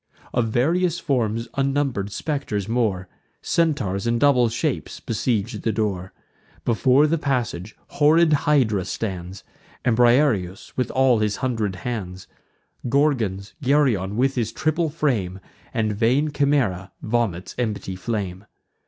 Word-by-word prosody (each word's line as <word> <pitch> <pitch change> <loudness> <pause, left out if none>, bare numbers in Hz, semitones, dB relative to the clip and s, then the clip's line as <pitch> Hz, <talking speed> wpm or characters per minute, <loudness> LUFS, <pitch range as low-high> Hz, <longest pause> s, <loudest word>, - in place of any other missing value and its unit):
Of 120 -2 +1
various 165 +9 +1
forms 115 -3 -1
unnumber'd 135 -7 0
spectres 135 -8 -3
more, 110 -6 0 0.4
Centaurs, 125 - 0
and 115 0 +1
double 125 -4 +4
shapes, 135 +5 -2
besiege 115 -2 -2
the 115 - 0
door. 100 -4 -2 0.5
Before 130 +4 +4
the 160 +1 +1
passage, 120 - -2
horrid 155 +2 +4
Hydra 130 -10 +2
stands, 95 -2 -5 0.4
And 120 -3 +3
Briareus 120 -7 +2
with 130 - -1
all 130 -3 +3
his 105 -1 0
hundred 110 -7 -1
hands; 95 -6 -4 0.6
Gorgons, 115 -9 +1
Geryon 125 -9 +2
with 135 +2 +2
his 115 -4 -1
triple 155 +1 0
frame; 120 - -1 0.3
And 110 -3 0
vain 125 +8 +2
Chimaera 125 -12 +1
vomits 110 -6 -1
empty 105 -5 -2
flame. 95 -2 -4
120 Hz, 120 wpm, -23 LUFS, 100-140 Hz, 0.6 s, double